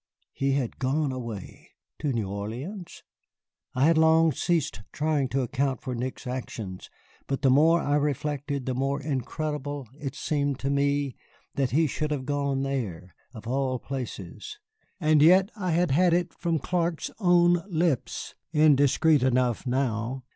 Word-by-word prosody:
He 135 0 0
had 135 -4 -2
gone 135 +2 0
away! 115 -6 -7 0.3
To 150 -3 -1
New 115 -5 -1
Orleans? 120 - -6 0.7
I 130 +2 +3
had 165 0 +4
long 160 0 +5
ceased 150 - -1
trying 150 -3 0
to 135 +1 0
account 130 +1 -1
for 130 - -3
Nick's 125 +3 -4
actions, 115 -7 -6 0.4
but 135 +1 -2
the 135 - +5
more 160 +5 +5
I 145 +1 +1
reflected, 145 -1 -2
the 130 - -1
more 135 +3 -1
incredible 145 0 -3
it 140 -2 -5
seemed 145 -2 -1
to 135 - 0
me 140 -1 +1 0.4
that 135 -2 0
he 160 +5 +3
should 155 +1 -2
have 140 -3 -2
gone 140 -1 -1
there, 105 -11 -4 0.2
of 110 - -9
all 130 +1 0
places. 120 -8 -7 0.4
And 155 -1 +4
yet 185 +6 +6
I 190 -4 -3
had 170 -2 +2
had 170 +4 +4
it 175 -1 -1
from 170 -2 -1
Clark's 170 +1 -1
own 175 -2 +4
lips 165 -6 -1 0.2
(indiscreet 150 -1 +4
enough 125 -1 +1
now!) 125 0 -1
140 Hz, 150 wpm, -27 LUFS, 130-155 Hz, 0.7 s, yet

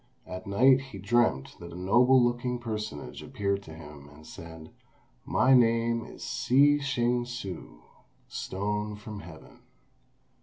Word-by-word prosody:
At 90 +1 -8
night 130 +7 +5
he 135 -7 -10
dreamt 100 - +1
that 85 - -9
a 85 - -9
noble 125 +8 +5
looking 120 0 0
personage 110 -9 -5
appeared 100 -6 -2
to 80 -5 -11
him, 75 -2 -12
and 75 +2 -16
said, 80 0 -11 0.5
"My 130 - +3
name 115 -1 +3
is - - -10
Shih 145 +3 +3
Ch'ing 125 -3 0
hsü 100 - -7 0.5
(Stone 105 +2 -3
from 105 0 -8
Heaven). 80 -3 -13
105 Hz, 130 wpm, -28 LUFS, 90-120 Hz, 0.5 s, night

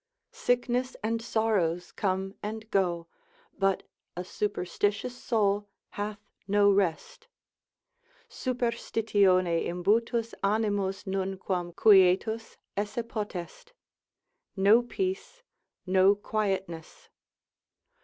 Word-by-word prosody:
Sickness 245 +1 0
and 225 +1 -1
sorrows 200 -7 0
come 190 0 -1
and 220 +1 -6
go, 175 -3 +1 0.5
but 195 -1 +2 0.3
a 180 - -2
superstitious 205 +4 -2
soul 205 -4 0 0.2
hath 205 0 -4 0.3
no 205 0 +4
rest; 195 -5 -1 1.0
superstitione 210 -8 +1
imbutus 225 +6 0
animus 205 -2 0
nunquam 190 -2 -2
quietus 210 +3 +4 0.2
esse 205 +3 -2
potest, 215 - -6 0.8
no 205 +4 +5
peace, 380 - -4 0.4
no 190 +1 +5
quietness. 195 - -3
205 Hz, 80 wpm, -28 LUFS, 190-225 Hz, 1.0 s, no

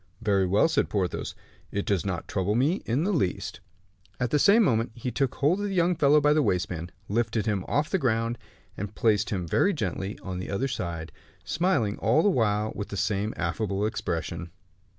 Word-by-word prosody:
"Very 100 -3 +2
well," 100 - +4
said 165 - +1
Porthos, 95 -4 -2 0.4
"it 100 - -2
does 100 -4 +1
not 90 -4 -3
trouble 100 +2 0
me 145 - +2
in 125 +7 +1
the 200 +3 +1
least." 95 - -1 0.6
At 125 -1 -1
the 150 - +3
same 215 +9 +6
moment 115 - +1
he 125 +1 -4
took 135 +2 0
hold 155 +8 +2
of 205 - -1
the 195 - -3
young 175 0 +3
fellow 150 -1 +5
by 150 0 +4
the 155 - +3
waistband, 90 - -1 0.2
lifted 110 0 0
him 105 -4 0
off 150 +2 0
the 190 - +2
ground, 115 -3 0 0.4
and 100 +1 -6
placed 105 -4 +2
him 90 -4 -2
very 200 - +3
gently 100 - -3
on 95 -1 -4
the 90 - -5
other 110 +7 0
side, 85 -10 -4 0.3
smiling 145 - +1
all 160 - +3
the 205 - +5
while 110 - +1
with 100 - -5
the 100 - -6
same 105 +2 0
affable 100 +4 -1
expression. 85 -5 -3
110 Hz, 195 wpm, -27 LUFS, 95-145 Hz, 0.6 s, same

